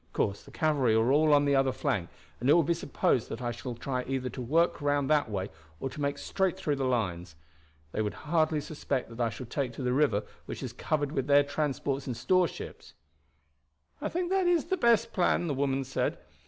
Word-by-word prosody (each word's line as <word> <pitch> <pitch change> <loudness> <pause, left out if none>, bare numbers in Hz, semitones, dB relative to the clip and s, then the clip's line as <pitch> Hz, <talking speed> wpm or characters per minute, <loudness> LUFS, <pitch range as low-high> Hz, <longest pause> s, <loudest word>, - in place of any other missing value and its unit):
Of - - -36
course 100 0 0
the - - -15
cavalry 145 -8 +2
are 110 +3 +3
all 150 +2 +4
on 145 0 +5
the 140 -1 +3
other 135 -1 +3
flank, 125 - -1 0.3
and 125 - 0
it - - +8
will 170 - +5
be 170 - +2
supposed 140 -7 0
that 115 - -5
I 120 -1 -2
shall 120 +1 -6
try 125 +1 -3
either 130 -1 -2
to 130 - -6
work 160 +8 +2
round 145 -1 +1
that 150 -5 +3
way 95 -3 -3 0.3
or 135 - -3
to 150 - -7
make 140 0 0
straight 190 -3 -1
through 145 -2 -1
the 135 - -1
lines. 90 -9 -1 0.6
They - - -1
would 105 -1 -2
hardly 155 -1 +2
suspect 145 -4 -3
that 115 +1 -5
I 115 - +2
shall 125 +3 -7
take 125 +1 -2
to 130 - -6
the 125 0 +1
river, 130 -7 +2 0.2
which - - -6
is - - -5
covered 145 -2 -1
with 135 -3 -2
their 145 0 +6
transports 140 -1 -2
and 125 -3 -3
store 180 +9 +3
ships." - - -10 1.1
"I - - -1
think 355 +1 -2
that 380 -2 +2
is 345 -3 +3
the 375 - 0
best 235 - +3
plan," 175 -1 +2
the 155 - -1
woman 135 0 0
said. 130 +1 -1
140 Hz, 225 wpm, -29 LUFS, 125-155 Hz, 1.1 s, it